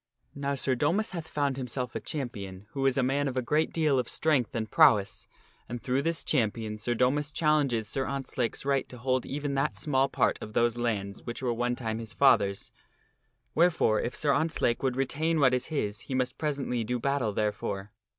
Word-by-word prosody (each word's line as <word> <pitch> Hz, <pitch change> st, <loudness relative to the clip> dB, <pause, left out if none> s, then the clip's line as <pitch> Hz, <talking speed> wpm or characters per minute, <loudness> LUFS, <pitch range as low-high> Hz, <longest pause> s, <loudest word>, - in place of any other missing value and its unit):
Now 140 Hz, 0 st, -2 dB
Sir 135 Hz, -1 st, 0 dB
Domas 170 Hz, -, +1 dB
hath 165 Hz, -3 st, -5 dB
found 140 Hz, -3 st, -1 dB
himself 125 Hz, -1 st, -3 dB
a -, -, -2 dB
champion 100 Hz, -9 st, -6 dB
who 135 Hz, -1 st, 0 dB
is 135 Hz, -, +1 dB
a 135 Hz, -, +3 dB
man 140 Hz, +2 st, +1 dB
of 130 Hz, -1 st, -3 dB
a -, -, +2 dB
great 150 Hz, +6 st, +1 dB
deal 155 Hz, -5 st, +2 dB
of 125 Hz, -, -2 dB
strength 145 Hz, -8 st, +1 dB
and 110 Hz, -1 st, -1 dB
prowess, 105 Hz, -2 st, +4 dB, 0.4 s
and 120 Hz, -, -4 dB
through 130 Hz, +3 st, 0 dB
this 165 Hz, +2 st, -1 dB
champion 110 Hz, -5 st, 0 dB
Sir 120 Hz, +3 st, -2 dB
Domas 140 Hz, +5 st, +1 dB
challenges 145 Hz, -8 st, +1 dB
Sir 135 Hz, -1 st, -2 dB
Ontzlake's 135 Hz, -3 st, -3 dB
right 140 Hz, -1 st, +1 dB
to 125 Hz, -, -9 dB
hold 130 Hz, +1 st, 0 dB
even 145 Hz, 0 st, -3 dB
that 135 Hz, -6 st, 0 dB
small 135 Hz, +5 st, +1 dB
part -, -, +1 dB
of 110 Hz, -, -7 dB
those 120 Hz, 0 st, +2 dB
lands 105 Hz, -5 st, -2 dB
which 120 Hz, +2 st, -6 dB
were 120 Hz, -2 st, +1 dB
one 120 Hz, +1 st, 0 dB
time 110 Hz, -2 st, -3 dB
his 115 Hz, -1 st, -6 dB
father's; 100 Hz, -8 st, +3 dB, 0.8 s
wherefore 165 Hz, -10 st, +3 dB
if 120 Hz, -, -3 dB
Sir 145 Hz, -2 st, +2 dB
Ontzlake 155 Hz, -5 st, +1 dB
would 130 Hz, -2 st, 0 dB
retain 155 Hz, +5 st, 0 dB
what 130 Hz, -3 st, +5 dB
is 125 Hz, 0 st, 0 dB
his 105 Hz, -9 st, -2 dB
he 130 Hz, -, -5 dB
must 130 Hz, -1 st, -1 dB
presently 140 Hz, -6 st, -1 dB
do 125 Hz, +2 st, -2 dB
battle 140 Hz, -3 st, 0 dB
therefore. 105 Hz, -1 st, -2 dB
130 Hz, 200 wpm, -29 LUFS, 115-140 Hz, 0.8 s, what